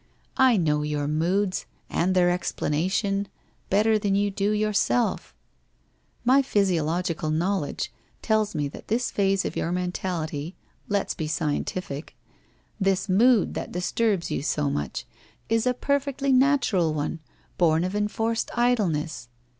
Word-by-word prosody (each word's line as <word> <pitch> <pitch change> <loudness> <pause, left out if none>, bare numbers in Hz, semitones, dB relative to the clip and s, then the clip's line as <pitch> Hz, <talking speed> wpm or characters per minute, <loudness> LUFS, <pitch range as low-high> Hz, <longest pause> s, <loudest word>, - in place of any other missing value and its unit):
I 260 -4 +6
know 150 -4 +1
your 150 -1 -2
moods, 185 +6 0 0.2
and 185 +2 0
their 175 -1 +4
explana 165 -1 -1
tion, 200 0 0 0.4
better 215 +2 +3
than 200 -2 +1
you 205 0 +1
do 195 +1 0
yourself. 215 +3 0 0.9
My 265 +3 +6
physiological 175 - 0
knowl 170 +2 0
edge - - -5 0.3
tells 215 -2 +1
me 145 -1 0
that - - -12
this 235 +3 0
phase 195 -1 +1
of - - -3
your 170 - -1
mentality 180 -3 -3 0.2
— - - -34
let's 200 -1 0
be 155 - -4
scientific! 155 0 -3 0.3
— - - -38
this 195 0 +1
mood 225 +3 +4
that - - -5
disturbs 180 0 0
you - - -1
so 145 -1 0
much, 75 -3 -3 0.4
is 225 +2 +2
a 250 - +3
perfectly 280 +1 0
natural 255 - +3
one, 150 +2 -2 0.4
born 165 -1 +3
of 185 +2 -2
enforced 225 +2 -1
idleness. 170 - 0
190 Hz, 140 wpm, -25 LUFS, 160-215 Hz, 0.9 s, I